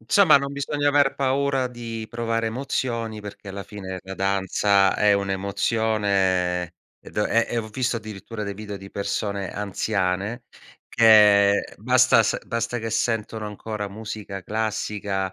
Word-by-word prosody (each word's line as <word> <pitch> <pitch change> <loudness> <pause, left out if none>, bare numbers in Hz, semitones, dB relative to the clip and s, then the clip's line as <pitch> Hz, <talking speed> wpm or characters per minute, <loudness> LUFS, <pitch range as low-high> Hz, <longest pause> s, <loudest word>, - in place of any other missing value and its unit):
Insomma, 155 - +5
non 140 0 -1
bisogna 145 +1 -1
aver 145 -1 +3
paura 135 -1 +1
di 115 -2 -6
provare 115 -1 -1
emozioni, 115 -2 -3
perché 105 0 -10
alla 100 +1 -6
fine 95 -2 -7
la 95 0 -7
danza 95 0 +2
è 105 -1 +4
un'emozione 100 -3 0 0.3
ed - - -13
è 115 +2 +2
e - - -3
e - - +1
ho 110 -1 -4
visto 120 +1 -1
addirittura 105 0 -7
dei 100 0 -4
video 105 -1 -7
di 95 0 -11
persone 100 -1 -3
anziane, 100 +2 -2 0.4
che 105 -3 +5
basta - - +4
s - - 0
basta 115 +1 -2
che 115 0 -4
sentono 110 -1 -1
ancora 105 0 -5
musica 105 -2 -7
classica, 105 -3 -2
105 Hz, 140 wpm, -24 LUFS, 100-115 Hz, 0.4 s, Insomma